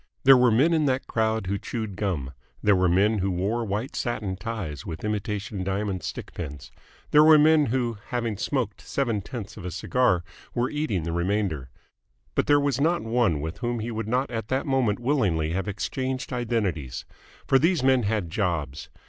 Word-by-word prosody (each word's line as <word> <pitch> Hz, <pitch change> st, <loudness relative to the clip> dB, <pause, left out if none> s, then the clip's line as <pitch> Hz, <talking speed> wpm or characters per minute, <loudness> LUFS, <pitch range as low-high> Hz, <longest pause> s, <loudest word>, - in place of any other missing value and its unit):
There 135 Hz, 0 st, +9 dB
were 125 Hz, -1 st, +5 dB
men 135 Hz, +10 st, +4 dB
in 155 Hz, -2 st, +2 dB
that 130 Hz, -1 st, 0 dB
crowd 110 Hz, -2 st, 0 dB
who 100 Hz, +2 st, -2 dB
chewed 110 Hz, -5 st, -4 dB
gum, 80 Hz, -10 st, -2 dB, 0.3 s
there 105 Hz, -1 st, +5 dB
were 90 Hz, -1 st, +3 dB
men 100 Hz, +5 st, +3 dB
who 95 Hz, +1 st, 0 dB
wore 100 Hz, +6 st, -1 dB
white 110 Hz, +5 st, -3 dB
satin 110 Hz, -6 st, -2 dB
ties 90 Hz, -6 st, -5 dB
with 80 Hz, -1 st, -7 dB
imitation 105 Hz, -1 st, -3 dB
diamond 95 Hz, 0 st, -2 dB
stick -, -, -6 dB
pins, 75 Hz, -5 st, -7 dB, 0.4 s
there 150 Hz, 0 st, +7 dB
were 155 Hz, 0 st, +8 dB
men 155 Hz, 0 st, +5 dB
who, 120 Hz, -2 st, -1 dB
having 115 Hz, -3 st, -2 dB
smoked 115 Hz, 0 st, -2 dB
seven 115 Hz, -7 st, -1 dB
tenths 110 Hz, -1 st, -7 dB
of -, -, -8 dB
a 90 Hz, -, -3 dB
cigar, 95 Hz, +1 st, +1 dB, 0.3 s
were 120 Hz, +1 st, 0 dB
eating 150 Hz, -, -1 dB
the 85 Hz, -, -3 dB
remainder: 85 Hz, -5 st, -1 dB, 0.6 s
but -, -, 0 dB
there 145 Hz, 0 st, +5 dB
was 140 Hz, -2 st, 0 dB
not 170 Hz, +3 st, +2 dB
one 110 Hz, -9 st, +1 dB
with 80 Hz, +2 st, -5 dB
whom 120 Hz, -1 st, -1 dB
he 115 Hz, +1 st, -4 dB
would 110 Hz, -1 st, -4 dB
not 125 Hz, +4 st, 0 dB
at 115 Hz, -2 st, -3 dB
that 130 Hz, +2 st, -1 dB
moment 130 Hz, -7 st, +1 dB
willingly 105 Hz, -, +1 dB
have 95 Hz, +2 st, -2 dB
exchanged 130 Hz, +6 st, -3 dB
identities. 105 Hz, -, -2 dB, 0.4 s
For 135 Hz, -, +4 dB
these 165 Hz, -1 st, +2 dB
men 130 Hz, -1 st, +4 dB
had 105 Hz, -6 st, -1 dB
jobs. 80 Hz, -8 st, -2 dB
110 Hz, 185 wpm, -26 LUFS, 95-125 Hz, 0.6 s, There